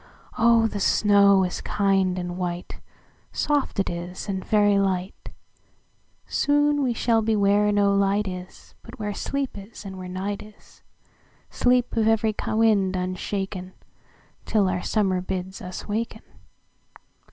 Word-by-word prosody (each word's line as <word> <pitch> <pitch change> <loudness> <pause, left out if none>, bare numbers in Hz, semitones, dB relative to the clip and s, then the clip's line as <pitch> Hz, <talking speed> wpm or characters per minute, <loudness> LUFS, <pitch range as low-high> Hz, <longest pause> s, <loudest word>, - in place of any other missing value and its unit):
Oh, 230 0 +4
the 210 -2 -2
snow 200 -1 +4
is 180 - -3
kind 195 -2 +1
and 175 -1 -4
white,—Soft 180 +9 -4
it 195 - +1
is, 175 +3 -5
and 190 -2 -3
very 205 -2 +3
light; 190 -1 -2 1.0
Soon 290 0 +2
we 260 -3 +1
shall 230 -1 +1
be 220 0 +1
where 205 0 +3
no 200 -1 +3
light 200 +1 +1
is, 180 0 -8
But - - -12
where 210 -1 -3
sleep 275 +6 -3
is, 200 +1 -10
and 190 -1 -7
where 185 - -7
night 195 +2 -4
is,—Sleep 245 +3 -4
of 220 -1 +2
every 225 -1 +2
wind 215 -4 +2
unshaken, 185 +1 -4 0.7
Till 205 -3 +2
our 180 -1 -1
Summer 190 -4 0
bids 190 0 -5
us 180 0 -7
waken." 220 +2 -3
200 Hz, 130 wpm, -24 LUFS, 185-220 Hz, 1.0 s, Oh